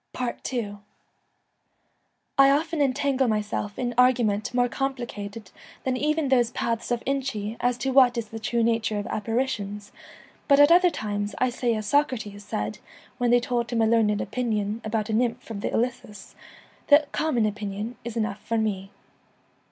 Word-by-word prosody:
ii 215 -5 -3 1.6
I 275 0 +7
often 310 +2 +1
entangle 275 -1 +1
myself 210 -1 -2
in 245 -1 -2
arguments 235 -5 +3
more 245 0 +2
complicated 235 -6 -5 0.3
than 260 -1 0
even 300 +1 0
those 245 -3 +3
paths 230 -1 -2
of 240 -1 -1
Inchy 255 -6 -2
as 245 0 +1
to 265 +1 -1
what 255 -2 +5
is 230 -2 -3
the 225 - -7
true 230 +1 0
nature 225 -2 +1
of 205 - -3
apparitions, 210 -2 -3 0.6
but 280 -1 +5
at 290 +2 +7
other 360 +1 +6
times 205 -7 -3
I 255 -1 +1
say 240 -1 0
as 215 -1 -4
Socrates 220 -6 0
said 105 - -4 0.4
when 245 -1 +2
they 245 0 +5
told 240 -1 -2
him 235 - -1
a - - +4
learned 220 -2 +2
opinion 220 -1 -2
about 215 0 -2
a - - -1
nymph 235 0 -1
of 200 -2 -5
the - - -1
Ilissus, 240 -4 -3 0.5
'The 290 +1 +6
common 255 -8 +1
opinion 210 +2 -4
is 235 -1 -5
enough 215 -2 -2
for 230 - -1
me.' 200 -3 -1
235 Hz, 160 wpm, -25 LUFS, 210-255 Hz, 1.6 s, I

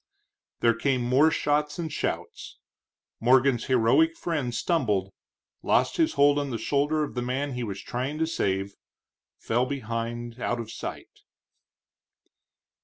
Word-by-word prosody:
There 115 -1 +4
came 125 +2 0
more 130 +6 +4
shots 150 -1 0
and 160 -3 -4
shouts. - - -4 0.6
Morgan's 125 0 +3
heroic 130 +7 +3
friend 150 -8 -2
stumbled, 115 - 0 0.5
lost - - +2
his 325 -1 +2
hold 145 0 +4
on 145 -1 -2
the 120 - -2
shoulder 145 +6 +1
of 150 - -5
the 125 - -2
man 130 +3 -2
he 125 -1 -3
was 100 -3 -5
trying 130 +5 -3
to 160 - +1
save, 100 -11 -1 0.6
fell 120 +3 0
behind 120 -2 -4
out 120 - -1
of 115 -1 -6
sight. - - -8
130 Hz, 135 wpm, -26 LUFS, 115-145 Hz, 0.6 s, There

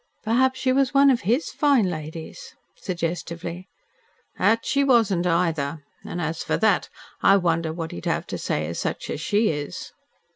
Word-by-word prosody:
"Perhaps 260 +3 +2
she 255 -1 +2
was 275 0 +1
one 275 0 +7
of 245 - +1
HIS 240 - 0
fine 280 -7 +3
ladies?" 165 - -7 0.2
suggestively. 170 0 -4 0.7
"That 230 +1 +3
she 280 0 +2
wasn't, 220 -9 +3
either. 165 -4 0 0.2
And, 175 - -5
as 160 -1 -3
for - - 0
that, 215 -4 +2 0.3
I 195 - +6
wonder 165 -3 0
what 165 0 -5
he'd 85 - -8
have - - -1
to - - -3
say 75 - -1
to 80 - -4
such - - -3
as - - -4
she 210 +6 +2
is." 145 -2 -5
180 Hz, 170 wpm, -24 LUFS, 165-245 Hz, 0.7 s, one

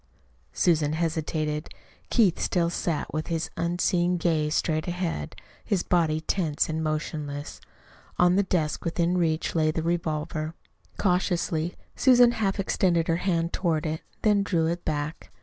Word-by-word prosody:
Susan 155 -4 +2
hesitated. 155 -1 -2 0.4
Keith 205 -8 +3
still 170 -2 +1
sat, 170 -3 -2
with 155 +1 -2
his 165 -2 -2
unseeing 175 +1 +1
gaze 155 -3 +1
straight 155 0 0
ahead, 175 - -3 0.3
his 190 -4 0
body 160 -3 +2
tense 160 -3 0
and 160 0 -2
motionless. 150 -2 -4 0.6
On 180 0 +4
the 200 - +4
desk 170 -6 -1
within 170 +1 0
reach 160 -2 0
lay 155 -2 +2
the 160 +1 -1
revolver. 160 -1 -2 0.4
Cautiously 175 -3 0 0.2
Susan 245 -2 +6
half 210 -4 -1
extended 175 -3 +1
her 165 - +2
hand 170 -2 0
toward 165 -4 0
it, 155 0 -2 0.2
then 210 -2 +4
drew 175 -5 +1
it 170 +2 -2
back. 150 +1 -3
165 Hz, 140 wpm, -26 LUFS, 155-180 Hz, 0.6 s, Susan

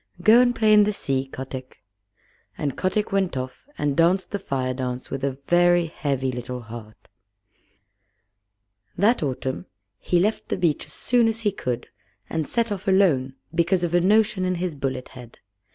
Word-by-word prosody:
Go 225 +4 +7
and 245 -1 +2
play 215 -1 +4
in 210 0 +7
the 210 +1 +1
sea, 135 -7 -1
Kotick." 130 -2 -8 0.7
And 140 -3 -2
Kotick 200 +3 -1
went 190 -7 0
off 130 - -6
and 145 -2 0
danced 175 +4 +2
the 205 - -2
Fire 130 -7 -2
dance 125 -1 -4
with 135 0 -4
a 140 - +2 0.2
very 175 0 +4
heavy 140 -5 -2
little 125 0 -5
heart. 110 -1 -11 1.9
That 215 +7 +3
autumn 130 - -3 0.3
he 175 - +1
left 210 +5 0
the - - -1
beach 170 -5 0
as 150 - -8
soon 240 -2 +2
as 225 0 -1
he 210 -2 +1
could, 125 -11 -4 0.4
and 160 -2 -1
set 230 -2 0
off 200 -1 -4
alone 160 -10 +3 0.2
because 175 +2 +2
of 175 -1 -1
a 175 - +4
notion 205 0 +3
in 185 0 0
his 175 -1 -2
bullet 135 -2 -4
head. 125 -2 -12
170 Hz, 170 wpm, -24 LUFS, 130-195 Hz, 1.9 s, Go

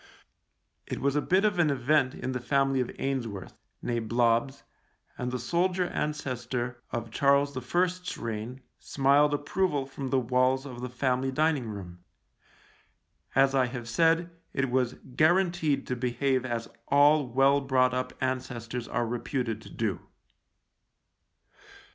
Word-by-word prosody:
It - - -4
was 140 +1 0
a 150 - +2
bit 190 +6 +2
of 205 -4 +1
an 160 -3 +4
event 135 0 +2
in 130 - -4
the 125 - -2
family 135 +1 +1
of 125 - -2
Ainsworth 120 -8 -3 0.2
— - - -49
nee 120 -1 -1
Blobbs 120 +4 +1 0.3
— - - -37
and 125 0 -2
the 125 - -2
soldier 180 +8 0
ancestor 125 -6 -3
of 115 -1 -4
Charles 140 +2 +3
I.'s 180 +8 -1
reign 115 +3 -5 0.2
smiled 140 +2 +3
approval 145 0 0
from 135 0 -6
the 130 0 +2
walls 130 +2 +1
of 125 -3 -8
the 125 - -4
family 130 +1 0
dining 150 -3 +1
room: 90 -4 -8 1.4
as 135 +1 +4
I 130 -2 +3
have 120 -2 -6
said, 165 +7 +2 0.2
it 135 -2 0
was 125 -1 +1 0.2
guaranteed 170 -3 +2
to 125 - -2
behave 130 +1 0
as 115 -1 -3 0.2
all 145 0 +5
well 135 +3 +3
brought 130 -2 +2
up 125 0 -2
ancestors 125 -2 -3
are 120 0 -1
reputed 120 -1 -3
to - - -12
do. 110 -5 -2
130 Hz, 145 wpm, -28 LUFS, 120-145 Hz, 1.4 s, all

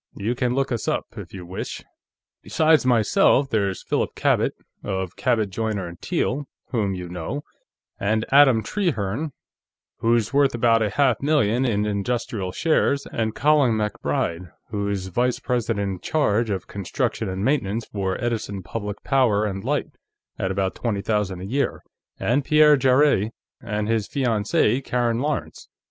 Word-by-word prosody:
You 110 +4 -1
can 125 0 0
look 135 0 0
us 120 - -2
up, - - 0
if - - -8
you 90 -2 -8
wish. 90 +2 -6 0.6
Besides 155 -4 +3
myself, 125 +3 +3
there 100 -3 +2
is 95 - -6
Philip - - -1
Cabot, - - +2 0.3
of 95 -3 -3
Cabot, 115 -6 +1
Joyner 100 -4 -3
& - - -51
Teale, 140 +3 -1 0.3
whom 105 -6 0
you 90 -1 -6
know, 90 - -5 0.6
and 110 +2 0
Adam 135 -5 +6
Trehearne, 145 - -1 0.7
who's 115 +1 +1
worth 140 -2 +3
about 115 -1 +3
a 105 - +1
half 130 +1 +2
million 135 -5 +2
in 105 -4 +1
industrial 105 -1 -2
shares, 140 - +1
and 110 -1 -1
Colin 145 -5 +4
MacBride, 90 -5 -2 0.2
who's 100 -2 -2
vice 120 +7 0
president 115 -4 -1
in 95 -2 -4
charge 115 - +1
of 95 -3 -2
construction 100 -1 -2
and 95 +2 -3
maintenance 115 -5 0
for 95 -2 -3
Edison 110 -5 -3
Public 105 +1 -5
Power 110 -7 +2
& 95 0 -6
Light, - - -1 0.5
at 95 - 0
about 95 0 -1
twenty 105 -5 -2
thousand 105 -4 -1
a - - -5
year, 135 +8 -1 0.4
and 135 +5 +1
Pierre 150 +1 +6
Jarrett 130 -5 +3 0.3
and 105 0 -2
his 110 -2 0
fiancée, 120 -1 +1
Karen 120 -2 0
Lawrence. 150 +2 -3
110 Hz, 155 wpm, -23 LUFS, 100-130 Hz, 0.7 s, Adam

